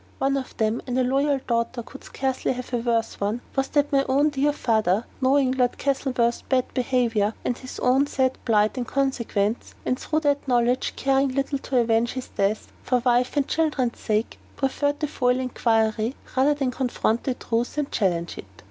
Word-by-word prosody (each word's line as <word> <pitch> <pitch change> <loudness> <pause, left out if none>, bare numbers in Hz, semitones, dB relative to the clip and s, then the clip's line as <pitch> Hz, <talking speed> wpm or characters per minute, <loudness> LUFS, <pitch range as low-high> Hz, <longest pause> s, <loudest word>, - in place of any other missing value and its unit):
One 275 +1 +1
of 270 -2 -5
them 220 +1 0
and 250 0 -1
a 260 - +3
loyal 275 +3 +2
daughter 235 +1 -1
could 275 - -12
scarcely 265 -1 -2
have 250 0 -8
a - - +3
worse 230 -1 -1
one 210 +4 -1
was 270 0 +1
that 290 +1 +1
my 275 -1 +3
own 285 +3 +4
dear 285 +1 +2
father, 220 -6 +1 0.2
knowing 265 0 +3
Lord 250 -2 +1
Castlewood's 260 -4 0
bad 255 -2 +1
behavior, 235 -5 +1
and 245 - 0
his 255 +1 -9
own 265 +3 +3
sad 260 -2 0
plight 215 +1 +2
in 245 - -2
consequence, 235 -6 -1
and 255 - 0
through 310 0 -1
that 285 -2 0
knowledge 245 0 +1
caring 270 -1 +1
little 275 0 -1
to 265 - -2
avenge 230 0 +2
his 260 -1 -6
death, 200 +2 -1
for 250 -2 0
wife 250 +3 +2
and 280 - +2
children's 290 -7 0
sake 215 0 -1 0.2
preferred 285 +2 0
to 300 - +1
foil 250 -3 +1
inquiry 225 -1 +1 0.2
rather 275 +3 +3
than 270 -3 -1
confront 245 -2 -1
the 260 - 0
truth 235 +4 -2
and 295 -2 -1
challenge 170 -4 -1
it. - - -8
255 Hz, 185 wpm, -24 LUFS, 235-275 Hz, 0.2 s, own